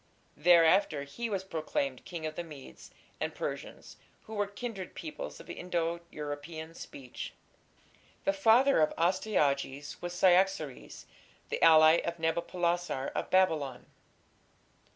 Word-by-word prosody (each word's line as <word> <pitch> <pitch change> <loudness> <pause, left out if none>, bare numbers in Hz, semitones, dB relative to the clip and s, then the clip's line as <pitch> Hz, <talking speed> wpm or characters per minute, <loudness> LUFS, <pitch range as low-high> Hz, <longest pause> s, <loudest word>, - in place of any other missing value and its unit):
Thereafter 165 -1 +4
he 230 +12 -5
was 195 -3 -2
proclaimed 155 -7 -3
King 165 -3 -6
of 155 - -3
the 175 - -4
Medes 150 -5 -12 0.3
and - - -3
Persians, - - -6 0.3
who 220 - -10
were 205 -1 0
kindred 200 -2 -6
peoples - - -7
of - - -13
Indo 170 -1 -2
European 155 +2 -6
speech. 130 -6 -8 0.9
The 295 - +2
father 265 - +5
of 155 - +3
Astyages 145 -6 0
was 175 0 -4
Cyaxares, 180 -5 +1 0.4
the - - -3
ally 160 0 +8
of 170 0 -3
Nabopolassar 170 -2 -1
of - - -3
Babylon. 155 -9 +2
170 Hz, 120 wpm, -31 LUFS, 150-190 Hz, 0.9 s, ally